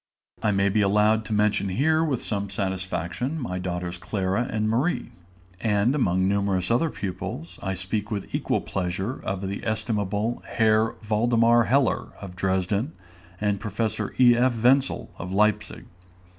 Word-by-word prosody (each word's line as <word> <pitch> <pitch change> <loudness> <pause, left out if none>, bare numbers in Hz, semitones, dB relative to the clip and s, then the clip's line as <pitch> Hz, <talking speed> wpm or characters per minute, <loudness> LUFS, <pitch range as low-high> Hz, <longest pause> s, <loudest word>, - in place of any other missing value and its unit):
I 110 - +2
may 100 0 +2
be 105 +2 +2
allowed 105 +2 +3
to - - -8
mention 105 -1 +2
here, 155 - +2
with 140 -7 -1
some 100 -2 -2
satisfaction, 95 - -3
my 90 -9 -3
daughters 90 -1 -4
Clara 95 +6 -1
and 110 0 0
Marie; 130 +11 0 0.5
and, 105 +2 +2
among 95 -10 +2
numerous 100 -1 0
other 140 +8 +2
pupils, 100 - -6
I 95 0 -2
speak 100 +4 -3
with 105 -4 -5
equal - - 0
pleasure 95 +6 -3
of 95 0 -3
the 100 +1 -5
estimable 110 0 -1
Herr 110 0 +2
Waldemar 115 +1 +4
Heller, 130 +2 +1
of 95 -2 -9
Dresden, 95 - 0 0.5
and 105 -1 0
Prof. 110 0 -2
E.F. 120 -1 +4
Wenzel, 135 +2 +2
of 90 +1 -5
Leipzig. 105 +1 +1
105 Hz, 145 wpm, -25 LUFS, 95-115 Hz, 0.5 s, Waldemar